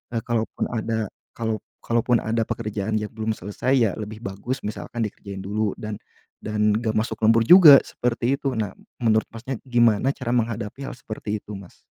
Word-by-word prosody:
eee, 115 - 0
kalaupun 115 -1 -2
ada 110 -2 -2 0.2
kalau 110 -2 -2 0.2
kalaupun 115 0 +1
ada 115 0 0
pekerjaan 110 -1 -3
yang 105 -1 -2
belum 110 -1 -2
selesai 105 +7 -2
ya, 115 -6 +3
lebih 110 +1 -7
bagus 100 +7 -4
misalkan 110 +2 -4
dikerjain 100 -2 -6
dulu 105 +1 -1
dan 105 -1 -6 0.4
dan 105 0 +1
gak 110 0 0
masuk 110 +1 0
lembur 115 +1 +5
juga 170 -6 +10
seperti 125 +2 -1
itu. 140 -2 -1
Nah, 105 -3 -1 0.3
menurut 110 -2 +3
Masnya 120 +3 -5
gimana 120 0 +3
cara 120 -2 -3
menghadapi 115 +2 -2
hal - - -5
seperti 110 -3 -5
itu 105 - -10
Mas? 95 -3 -14
110 Hz, 170 wpm, -24 LUFS, 105-120 Hz, 0.4 s, juga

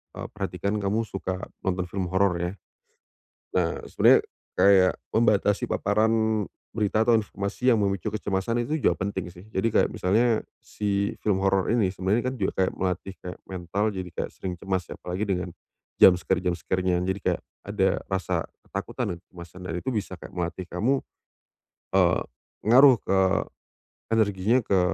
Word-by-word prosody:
eee, - - -5
perhatikan 100 +1 -3
kamu 105 +3 0
suka 95 -2 -4 0.2
nonton 90 -1 -1
film 95 0 -3
horor 95 -1 +3
ya? 90 +1 -1 1.1
Nah 85 -1 -1
sebenernya, - - +5 0.4
kayak 95 -2 +5 0.2
membatasi 105 -3 +2
paparan 110 +1 +2 0.3
berita 110 0 +1
atau 120 - +5
informasi 105 +3 0
yang 115 - +4
memicu 100 -1 0
kecemasan 105 +2 -1
itu 155 - -1
juga - - +2
penting 95 -2 -3
sih. 90 +3 -14
Jadi 105 +5 +1
kayak - - +4
misalnya 110 +4 +2 0.2
si 100 -1 -2
film 105 -3 +2
horor 95 -1 +1
ini 105 -5 +2
sebenarnya 100 +6 0
kan 130 - -1
kayak 120 - -8
juga 95 - +1
melatih 95 +1 -3
kayak 90 0 -7
mental 95 +4 -2
jadi 95 -2 -5
kayak - - -4
sering 90 -2 -5
cemas, 95 0 -1
ya - - -7
apalagi 90 +3 -4
dengan 90 -3 -2 0.5
jumpscare-jumpscare-nya, 90 0 +3
jadi 95 +1 -1
kayak - - 0 0.3
ada 100 -1 +1
rasa 95 -2 -1 0.2
ketakutan - - -3
dan - - -11
kecemasan, 85 0 -12
dan 80 - -4
itu 130 - -2
bisa 105 -6 -3
kayak - - -10
melatih 90 +1 -3
kamu, 125 +10 +1 0.9
eee, - - +4 0.4
ngaruh 130 +3 +8
ke 95 - +1 0.9
energinya, 110 +1 +3
ke 95 -2 +2
95 Hz, 150 wpm, -26 LUFS, 90-110 Hz, 1.1 s, ngaruh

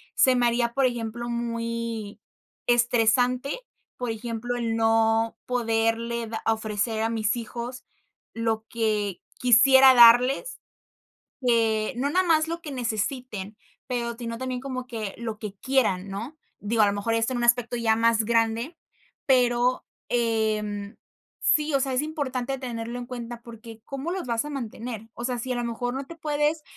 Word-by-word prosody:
se 260 -1 +5
me 245 -1 +2
haría, 235 0 +1
por 275 -1 +3
ejemplo, 235 -1 -3
muy 230 -2 -3 0.5
estresante, 245 - +2 0.4
por 245 -2 -2
ejemplo, 230 +1 -4
el 230 -2 -1
no 225 0 +2
poderle 230 -1 0
da 220 0 -5
ofrecer 220 0 0
a 225 - +1
mis 220 -1 0
hijos 240 +2 -6 0.5
lo 225 -1 -1
que 210 -4 -1 0.2
quisiera 265 +2 +7
darles, 245 - +6 0.9
eh, 225 -1 +2
no 265 +3 0
nada 370 +3 +2
más 320 -1 +3
lo 335 +1 -4
que 295 - -7
necesiten, 225 -3 -3 0.3
pero, 235 -2 -2
sino 230 -1 -5
también 255 0 -3
como 255 -2 -5
que 220 -5 -5
lo 225 -2 -5
que 210 -3 -6
quieran, 210 -8 +1
¿no? 230 +11 -6 0.3
Digo, 220 +1 +2
a - - +6
lo 200 - +2
mejor 205 +3 -1
esto 225 +3 +1
en - - -1
un 240 - 0
aspecto 240 0 +2
ya 225 -2 +2
más 230 -1 +3
grande, 230 +6 0 0.5
pero, 250 -1 +3 0.2
em, 215 -3 -1 0.4
sí. 305 -1 +2
O 275 - +3
sea, 265 0 -1
es 255 - +1
importante 270 -4 -3
tenerlo 235 -2 -5
en 245 - -7
cuenta, 240 -1 -7
porque 230 -1 -12
¿cómo 275 +5 -4
los 370 -5 -4
vas 230 +1 0
a 295 - -6
mantener? 230 -4 -6
O 235 - -7
sea, 250 -1 -1
si 255 +3 -5
a - - -2
lo 240 - -2
mejor 245 +1 -3
no 270 +1 -4
te 335 - -9
puedes 300 0 0
235 Hz, 165 wpm, -26 LUFS, 225-255 Hz, 0.9 s, quisiera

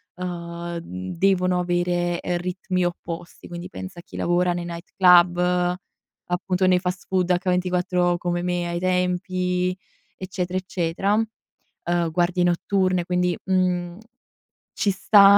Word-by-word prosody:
ehm, 170 -1 -5
mhmm, 90 - -6
devono 185 -1 +3
avere, 175 0 0
ehm, 175 -1 -1
ritmi 180 0 -2
opposti 170 -1 -6
quindi 175 +1 -7
pensa 185 -2 -8
a - - -11
chi - - -14
lavora 175 0 +2
nei 175 - -3
night 170 0 -8
club, 180 0 +5 0.5
appunto 180 +1 0
nei 180 -1 +4
fast 180 0 -3
food 185 -1 +1
H24, 180 -1 +1
come 175 0 -1
me 175 -1 -1
ai 170 0 -2
tempi, 180 0 0 0.4
eccetera, 185 -1 -3
eccetera; 185 +1 -1
uhm, 175 -6 -3
guardie 175 +1 +1
notturne 185 +1 +1
quindi, 180 -1 +1
mhmm, 180 -2 0 0.8
ci 200 - +1
sta 200 +1 +7
180 Hz, 130 wpm, -24 LUFS, 175-185 Hz, 0.8 s, sta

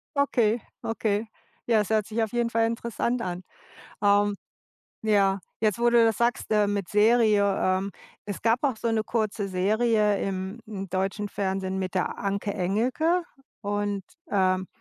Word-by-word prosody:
Okay, 245 -5 +2 0.2
okay. 215 -1 -1 0.4
Ja, 230 -2 +4
das 210 - -1
hört 215 -2 +2
sich 225 +1 -1
auf 220 - -3
jeden 240 -1 +1
Fall 230 0 +2
interessant 235 +1 -2
an. 180 -2 -4 0.6
Ähm. 205 0 +4 0.7
Ja, 200 -3 +3 0.2
jetzt, 215 -2 +1
wo 240 0 +3
du 235 -1 +5
das 225 -1 +2
sagst, 240 0 0 0.2
mit 200 -3 -2
Serie, 215 -1 +4 0.2
ähm, 185 +1 +1 0.3
es 205 -2 -6
gab 230 +5 +2
auch 265 -5 +1
so 230 - -2
'ne 225 -1 +1
kurze 215 -3 -1
Serie 210 +2 +2
im, 190 +2 -3
hm, 195 -3 -6
deutschen 190 +3 -2
Fernsehen 190 -1 -2
mit 185 -1 -3
der 185 - -1
Anke 200 +1 -2
Engelke 250 - +1 0.4
und, 205 -1 -2 0.3
ähm, 185 -1 +2
210 Hz, 155 wpm, -26 LUFS, 195-230 Hz, 0.7 s, du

